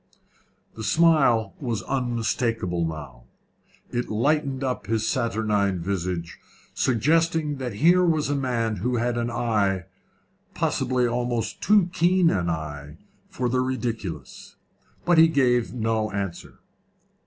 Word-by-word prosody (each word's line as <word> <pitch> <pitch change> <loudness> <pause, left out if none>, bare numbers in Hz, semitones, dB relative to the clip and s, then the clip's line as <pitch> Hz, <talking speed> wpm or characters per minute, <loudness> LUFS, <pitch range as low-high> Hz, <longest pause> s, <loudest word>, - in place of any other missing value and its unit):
The 110 - -8
smile 135 -9 +3
was 115 -8 -3
unmistakable 115 -8 -1
now. 75 -6 -8 0.7
It 120 0 -2
lighted 140 +4 0
up 130 -5 -3
his 110 0 0
saturnine 105 -4 0
visage, 85 -1 -3 0.3
suggesting 155 +4 +1
that 125 -4 -4
here 175 - +4
was 160 -4 +2
a 145 - 0
man 120 -5 -1
who 125 +7 -1
had 120 +1 0
an 120 0 -1
eye 105 -6 0 0.7
possibly 125 -1 0
almost 120 -1 -2
too 205 -4 +3
keen 175 0 +3
an 90 -3 0
eye 75 -2 -5 0.3
for 125 - -2
the 125 +1 0
ridiculous. 120 -7 -4 0.5
But 175 -2 +4
he 165 - +8
gave 125 -6 +2
no 110 -2 -1
answer. 100 -3 -5
120 Hz, 120 wpm, -24 LUFS, 100-135 Hz, 0.7 s, he